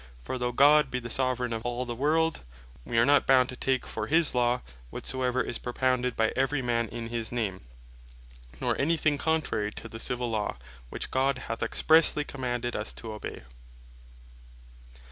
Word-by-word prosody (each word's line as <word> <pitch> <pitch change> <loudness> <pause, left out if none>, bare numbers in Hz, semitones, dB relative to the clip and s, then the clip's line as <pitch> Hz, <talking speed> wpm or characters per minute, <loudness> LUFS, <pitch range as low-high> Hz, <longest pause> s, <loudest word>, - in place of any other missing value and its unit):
For 125 - -4
though 125 0 -1
God 145 +4 +5
be 125 - -2
the 120 -2 -6
Soveraign 125 -2 0
of 115 0 -4
all 120 +1 -2
the 120 - -4
world, 160 +6 +1 0.5
we 115 - -2
are 115 - +5
not 145 +1 +4
bound 130 -1 +5
to 125 - -5
take 130 0 0
for - - -4
his 160 0 +3
Law, 125 0 +1 0.3
whatsoever 130 - -1
is 120 - -5
propounded 125 0 0
by 110 0 +1
every 135 +1 0
man 115 -1 0
in 115 -1 -6
his 115 -1 -3
name; 105 -6 -2 1.0
nor - - 0
any 165 +4 +2
thing 150 -2 +1
contrary 155 -10 0
to - - -8
the 115 0 -9
Civill 125 0 -2
Law, 105 - -2 0.3
which - - -6
God 135 0 +1
hath 115 -3 -5
expressely 160 -2 +4
commanded 120 -3 -3
us 105 - -3
to 110 -1 -8
obey. 105 - -7
125 Hz, 175 wpm, -28 LUFS, 115-135 Hz, 1.0 s, God